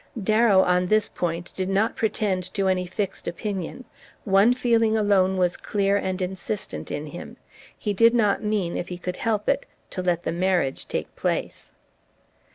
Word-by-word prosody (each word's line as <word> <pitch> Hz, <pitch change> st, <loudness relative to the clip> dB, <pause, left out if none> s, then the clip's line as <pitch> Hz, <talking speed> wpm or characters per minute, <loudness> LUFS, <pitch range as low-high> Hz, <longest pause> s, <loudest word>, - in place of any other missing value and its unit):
Darrow, 215 Hz, -1 st, +4 dB
on 180 Hz, 0 st, +2 dB
this 215 Hz, +2 st, +3 dB
point, 170 Hz, 0 st, -4 dB
did 190 Hz, 0 st, -2 dB
not 200 Hz, +4 st, +1 dB
pretend 195 Hz, -4 st, -1 dB
to 195 Hz, -2 st, +1 dB
any 185 Hz, -1 st, +1 dB
fixed 195 Hz, +1 st, -4 dB
opinion; 195 Hz, +6 st, -4 dB, 0.4 s
one 200 Hz, +3 st, +5 dB
feeling 230 Hz, -3 st, +2 dB
alone 190 Hz, -3 st, +3 dB
was 180 Hz, -1 st, +2 dB
clear 200 Hz, -1 st, 0 dB
and 185 Hz, -2 st, -1 dB
insistent 190 Hz, +3 st, -5 dB
in 145 Hz, -, -4 dB
him: 165 Hz, +3 st, -9 dB, 0.4 s
he 210 Hz, -, -2 dB
did 230 Hz, +4 st, +5 dB
not 210 Hz, -4 st, +2 dB
mean, 210 Hz, -5 st, -1 dB
if -, -, -4 dB
he 180 Hz, -, -6 dB
could 180 Hz, 0 st, -5 dB
help 215 Hz, -2 st, -1 dB
it, 275 Hz, 0 st, +1 dB, 0.2 s
to 185 Hz, -, -3 dB
let 175 Hz, -1 st, 0 dB
the -, -, -1 dB
marriage 175 Hz, -5 st, 0 dB
take -, -, -4 dB
place. -, -, -3 dB
195 Hz, 165 wpm, -24 LUFS, 180-215 Hz, 0.4 s, one